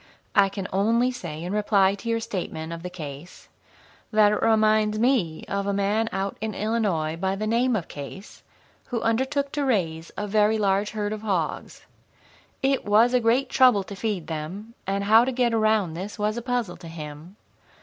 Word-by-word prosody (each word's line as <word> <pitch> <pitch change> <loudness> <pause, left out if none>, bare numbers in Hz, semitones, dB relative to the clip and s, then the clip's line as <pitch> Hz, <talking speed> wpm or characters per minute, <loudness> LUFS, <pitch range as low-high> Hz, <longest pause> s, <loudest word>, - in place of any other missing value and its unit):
I 200 -1 +5
can 195 -1 -5
only 230 +6 +2
say 165 -10 -7
in 180 +3 -4
reply 205 -2 +3
to 215 +3 -6
your 230 0 +1
statement 170 -6 -5
of 165 - -7
the 180 - -5
case 155 -2 -9 0.6
that 215 -1 +5
it 210 - -1
reminds 215 -1 +3
me 220 -9 +1
of 200 0 -2
a 200 - +1
man 210 +3 +1
out 195 +1 -3
in 215 -2 -3
Illinois, 200 -8 0
by 190 +3 -1
the 215 +2 -3
name 235 +3 +2
of 185 -6 -3
Case, 145 +8 -9 0.5
who 240 - -2
undertook 265 +5 0
to 290 - -1
raise 170 -10 -1
a 210 - -2
very 210 +1 +2
large 200 0 +1
herd 210 -1 -3
of 215 - -6
hogs. 190 -7 -3 0.8
It 270 0 +2
was 220 +4 +4
a 250 - +5
great 240 +3 +2
trouble 250 -6 +4
to 200 - -9
feed 195 -4 -2
them, 170 +8 -6
and 195 +1 -1
how 220 +3 +6
to 260 - -1
get 245 -2 +1
around 215 -6 +2
this 190 +6 -6
was 210 0 0
a 240 - -3
puzzle 245 -6 -2
to 170 - -11
him. 155 +2 -9
210 Hz, 190 wpm, -25 LUFS, 185-225 Hz, 0.8 s, how